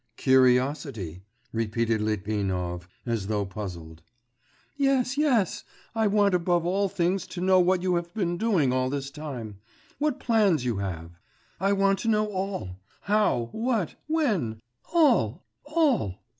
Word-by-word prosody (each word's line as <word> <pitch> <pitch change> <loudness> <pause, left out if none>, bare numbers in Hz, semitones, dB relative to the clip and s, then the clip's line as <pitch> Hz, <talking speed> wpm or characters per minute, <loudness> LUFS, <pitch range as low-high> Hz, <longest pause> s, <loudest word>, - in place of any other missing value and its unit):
'Curiosity,' 130 - +2 0.3
repeated 115 0 0
Litvinov, 95 -4 -2 0.2
as 115 -5 -2
though 105 -1 0
puzzled. 85 -5 -7 0.7
'Yes, 270 -2 +1
yes... 260 - +1 0.3
I 225 -1 +2
want 205 -1 +3
above 175 -1 +1
all 195 +3 +1
things 180 +1 0
to 180 - -7
know 185 +1 +4
what 180 0 +2
you 185 -1 +1
have 170 0 -4
been 175 -5 0
doing 175 - +2
all 130 0 +1
this 140 0 -4
time, 130 -9 -7 0.4
what 290 -2 0
plans 205 - +2
you 120 -4 0
have; 85 -3 -5 0.4
I 195 +2 +2
want 195 0 +2
to - - -4
know 215 -1 +3
all, 190 - -4 0.2
how, 205 - +1
what, 225 -6 -1
when... 215 - 0 0.3
all, 255 - +3 0.2
all. 290 - +1
170 Hz, 135 wpm, -26 LUFS, -, 0.7 s, know